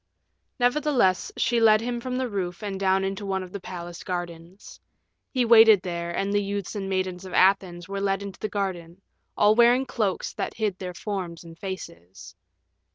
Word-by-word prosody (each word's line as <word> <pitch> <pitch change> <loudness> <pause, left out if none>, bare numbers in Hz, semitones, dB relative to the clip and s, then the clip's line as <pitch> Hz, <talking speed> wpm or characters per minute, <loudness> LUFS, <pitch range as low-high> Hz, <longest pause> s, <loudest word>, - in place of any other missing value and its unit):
Nevertheless, 245 -6 +2
she 235 0 +2
led 215 -1 +6
him 240 +1 -3
from 255 +1 -3
the 260 0 -1
roof 190 -3 -4
and 195 -2 -4
down 190 0 +2
into 195 +1 -3
one 190 -1 -2
of 180 - -11
the 200 - -6
palace 175 -2 -8
gardens. 175 0 -7 0.5
He 255 -3 +1
waited 225 -4 +7
there, 170 -1 -4
and 195 +3 -2
the 205 - +2
youths 200 -1 -4
and 195 -2 -4
maidens 185 -1 -2
of 185 - -9
Athens 185 -2 +2
were 195 0 -4
led 195 0 0
into 200 -1 -8
the 215 - -3
garden, 190 -3 -4 0.3
all 210 +1 +5
wearing 240 +3 +5
cloaks 210 -7 -2
that - - -4
hid 210 -4 -2
their 180 -1 -6
forms 180 -6 -5
and 165 -1 -12
faces. 95 - -8
195 Hz, 180 wpm, -25 LUFS, 180-215 Hz, 0.5 s, waited